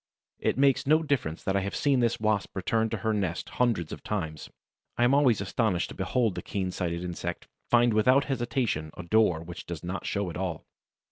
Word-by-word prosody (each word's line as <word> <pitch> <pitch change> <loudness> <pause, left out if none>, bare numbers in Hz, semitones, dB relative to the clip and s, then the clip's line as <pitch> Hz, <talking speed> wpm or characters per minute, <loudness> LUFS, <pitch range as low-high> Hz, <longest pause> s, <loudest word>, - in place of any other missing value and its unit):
It - - 0
makes 135 -1 +3
no 155 +2 +4
difference 135 - -1
that 95 - 0
I - - +4
have 100 +1 -3
seen 140 -3 +2
this 120 -1 +1
Wasp 110 -2 0
return 110 +4 0
to 115 - -2
her 110 - +2
nest 95 -5 -2
hundreds 110 -10 +1
of - - -7
times; 80 -8 -4 0.5
I 120 - +3
am 125 +2 +4
always 130 -7 +4
astonished 100 -2 0
to - - -7
behold 105 +3 0
the - - -5
keen 95 -2 -3
sighted 85 -1 -3
insect 90 -1 -5 0.2
find 120 -1 +4
without 130 +6 +4
hesitation 120 - -1
a 90 - -6
door 90 -3 +2
which 85 0 -9
does 85 -3 -6
not 90 +3 -4
show 100 -3 -1
at - - -7
all. 90 -4 -3
105 Hz, 205 wpm, -28 LUFS, 90-120 Hz, 0.5 s, no